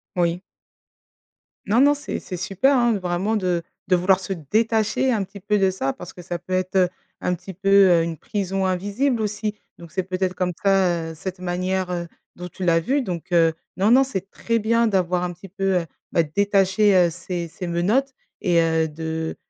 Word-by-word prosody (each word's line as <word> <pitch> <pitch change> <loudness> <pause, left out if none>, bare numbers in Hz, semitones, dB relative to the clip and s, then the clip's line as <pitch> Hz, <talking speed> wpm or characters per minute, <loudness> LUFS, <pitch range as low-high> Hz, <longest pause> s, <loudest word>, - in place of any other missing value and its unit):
Oui. 175 0 +1 1.3
Non 220 +5 +4
non 290 +1 +5
c'est 285 - -5
c'est 180 - -7
super, 195 +9 +2
hein, 240 -2 +3
vraiment 185 +5 -1
de 180 -4 0 0.2
de 185 - +4
vouloir 185 +2 +3
se 190 0 -4
détacher 220 - +1
un 210 -4 +1
petit 200 +2 -11
peu 210 +2 0
de 190 -1 +3
ça 135 -8 -2
parce 180 +1 -10
que 180 - -11
ça 175 0 -4
peut 185 - -7
être, 185 +1 -1
heu, 185 -2 +4 0.3
un 180 - 0
petit 185 +2 -10
peu, 195 +2 -2 0.2
heu, 170 -1 +4
une 165 -1 -4
prison 195 +2 -2
invisible 205 +8 0
aussi. 210 0 -2 0.2
Donc 170 -2 -12
c'est 185 - -1
peut-être 185 0 -2
comme 180 -1 0
ça, 180 -4 +2
heu, - - -10
cette 185 +3 -6
manière, 185 +1 -1
heu, 175 -1 -3 0.3
dont 180 0 -7
tu 190 - -8
l'as 165 -1 +4
vu 270 - 0
donc, 180 -3 -5
heu, 165 -2 +4 0.2
non, 195 +3 +3
non 260 +2 +7
c'est 195 -8 -5
très 230 0 -1
bien 230 +2 +2
d'avoir 180 -3 +1
un 175 0 -2
petit 180 +2 -13
peu, 195 +1 -7 0.2
heu 170 - -7 0.3
bah, 170 - +3
détacher, 200 +4 +2
heu, 175 -2 +5
ces 175 0 -5
ces 180 +3 -7
menottes 210 +11 +1 0.3
et 175 -4 +3
heu, 160 -1 +2
de, 160 +1 -4
185 Hz, 205 wpm, -23 LUFS, 175-205 Hz, 1.3 s, non